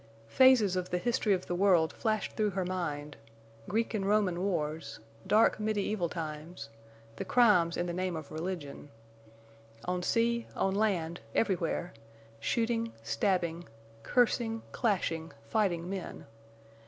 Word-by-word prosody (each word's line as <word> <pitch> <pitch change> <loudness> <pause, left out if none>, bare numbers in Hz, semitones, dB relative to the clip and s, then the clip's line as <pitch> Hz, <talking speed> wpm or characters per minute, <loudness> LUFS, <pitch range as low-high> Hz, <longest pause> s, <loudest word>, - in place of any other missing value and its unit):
Phases 245 - +5
of 180 0 -2
the 180 - 0
history 225 +2 0
of 185 -2 +1
the - - -3
world 175 -3 +3
flashed 215 -2 -1
through 215 -1 +1
her 190 -1 -2
mind—Greek 145 - -4
and 210 -3 -1
Roman 200 -4 +2
wars, 160 -5 -2 0.3
dark, 215 +2 +4
mediæval 210 -4 -1
times, 160 -3 -6 0.5
the - - -3
crimes 185 -6 +4
in 175 - 0
the 175 - -3
name 185 0 -2
of 155 -3 -7
religion. 155 -3 -5 1.0
On 180 0 -1
sea, 235 +4 +1
on 195 - +1
land, 185 -5 0 0.2
everywhere—shooting, 170 - -2
stabbing, 170 - 0 0.3
cursing, 225 - +1
clashing, 170 -7 -1
fighting 175 - 0
men! 190 -1 -6
180 Hz, 120 wpm, -31 LUFS, 160-210 Hz, 1.0 s, Phases